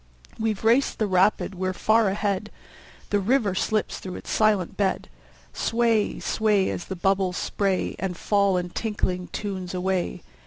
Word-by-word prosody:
We've 220 -2 -1
raced 235 +5 +3
the 215 - +1
rapid, 195 +1 +2
we're 185 0 -2
far 220 +2 +3
ahead! 200 +1 -1 0.6
The 205 - +3
river 215 -1 +2
slips 215 +2 -1
through 185 -1 -7
its - - -7
silent 210 -4 +2
bed. 195 -2 0 0.5
Sway, 230 -2 +1
sway, 210 -3 +1
As - - -5
the 190 - -5
bubbles 190 0 +1
spray 195 -2 -1
And 185 -2 -3
fall 200 -1 +2
in 180 0 -3
tinkling 185 -5 -2
tunes 190 -3 -5
away. 180 -1 -1
195 Hz, 150 wpm, -25 LUFS, 185-215 Hz, 0.6 s, raced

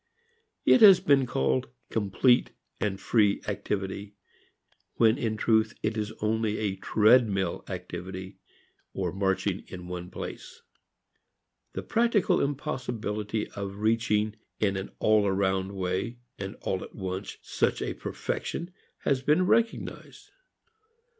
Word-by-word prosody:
It 255 - +6
has 195 -4 +10
been 135 -3 +3
called 65 - 0 0.2
complete 110 +4 +3 0.3
and 95 -2 -1
free 105 -4 +3
activity 100 +1 -3 0.8
when 115 +3 +4
in 110 -4 -1
truth 110 -1 +2
it 110 +1 0
is 105 -1 -2
only 110 0 +1
a 100 -3 -1
treadmill 105 -1 +3
activity 95 +1 -6 0.6
or 90 -3 -1
marching 95 0 0
in 90 -1 -8
one 90 0 -6
place. - - -8 1.1
The - - -4
practical 230 -4 +2
impossibility 115 -6 -2
of 100 -1 -5
reaching, 110 -1 +1 0.2
in 100 -2 +1
an 95 0 -4
all 105 -1 +3
around 95 0 0
way 95 +6 -2 0.2
and 95 0 -5
all 95 - -2
at - - -12
once 95 0 -5
such - - 0
a - - -2
"perfection" 175 +2 -4 0.3
has 135 -2 +1
been 150 +7 +3
recognized. 230 +4 -1
105 Hz, 120 wpm, -28 LUFS, 95-115 Hz, 1.1 s, has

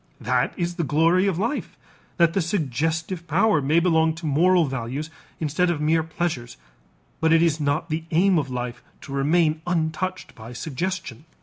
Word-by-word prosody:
That - - 0
is 175 -1 -2
the 170 - 0
glory 165 +6 +3
of 190 -4 0
life 230 +10 -3 0.4
that 170 -1 +4
the 195 - +1
suggestive 165 - -2
power 165 0 +3
may 150 +5 +3
belong 160 -2 +2
to 165 0 -8
moral 170 +4 +3
values 135 +3 -4 0.3
instead 165 +4 +1
of 170 -3 -1
mere 160 +2 +2
pleasures, 160 - -4 0.6
but 160 0 +2
it 165 0 +5
is 160 -2 +1
not 150 +3 -1
the 160 +1 -2
aim 180 +2 +3
of 140 -3 -3
life 125 -1 -4 0.2
to - - -10
remain 155 +3 +2
untouched 175 +2 -2
by 115 +2 -10
suggestion. 155 0 -4
160 Hz, 170 wpm, -24 LUFS, 145-175 Hz, 0.6 s, it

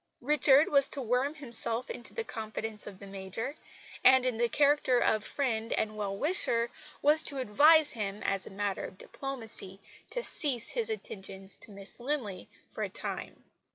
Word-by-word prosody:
Richard 285 +1 +5
was 280 -1 +4
to 280 - +1
worm 250 +6 0
himself 235 -4 +4
into 240 - -8
the 460 - -3
confidence 220 - -6
of 200 -2 -9
the 200 - -11
Major, 195 +7 -5 0.5
and, 260 0 +6
in 250 -3 0
the 235 0 +1
character 285 -3 +3
of 215 -3 +2
friend 230 -5 -2
and 215 0 -1
well 200 -2 -3
wisher, 260 - +1 0.3
was 300 +2 +5
to 280 - +4
advise 295 +6 +5
him, 205 -2 -4
as 195 -1 -1
a - - -7
matter 200 0 -3
of 185 - -10
diplomacy, 225 -7 -7 0.3
to - - -4
cease 260 - -2
his 470 -2 -2
attentions 195 - -4
to - - -11
Miss 200 +2 -7
Linley 240 - -4 0.2
for - - -8
a - - -1
time. - - -6
235 Hz, 170 wpm, -30 LUFS, 205-285 Hz, 0.5 s, and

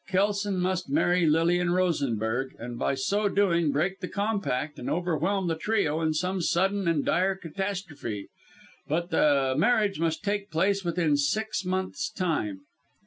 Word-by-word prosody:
Kelson 200 +1 +1
must 185 0 -1
marry 180 - +3
Lilian 170 +3 +3
Rosenberg, 135 - 0
and 120 0 -7
by - - +1
so 200 +10 0
doing, 170 -6 +2
break 175 +7 0
the 185 - -4
compact 200 -10 -2
and 125 - -4
overwhelm 180 +3 0
the 165 - +1
trio 165 -3 0
in 160 -1 +1
some 180 +4 -1
sudden 190 +3 +1
and 160 -4 +1
dire 190 +2 +2
catastrophe. 175 - -5 0.6
But 170 +4 -1
the 140 -3 +3
marriage 205 - +2
must 165 +3 -1
take 205 0 -2
place 195 +4 +1
within 165 -4 +1
six 215 +10 0
months' 190 +10 -2
time. 160 - -2
180 Hz, 145 wpm, -27 LUFS, 150-195 Hz, 0.6 s, marry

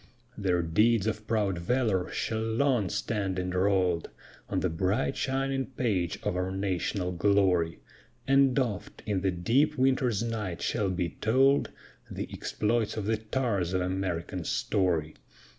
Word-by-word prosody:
Their 90 -4 +1
deeds 105 +6 +3
of 110 -1 -3
proud 100 -5 0
valor 100 -2 0
shall 110 -1 -2
long 115 -2 +1
stand 105 -2 -2
enroll'd 90 -1 +1 0.4
On - - 0
the - - +2
bright 95 +11 0
shining 135 0 -1
page 105 - -1
of - - -1
our 90 +1 -1
national 95 -1 -1
glory: 90 -3 +2 0.5
And 135 -1 +4
oft, 120 -8 -2
in 100 -3 0
the 95 - +1
deep 120 - +1
winter's 130 -4 +2
night, 105 -7 -3
shall 105 -4 0
be 90 -2 -1
told 135 +5 +3 0.4
The - - -5
exploits 110 0 -1
of 105 - -2
the 110 +1 +1
tars 110 -5 -1
of 95 - +1
American 90 -1 -2
story. 80 -3 0
100 Hz, 140 wpm, -29 LUFS, 90-115 Hz, 0.5 s, And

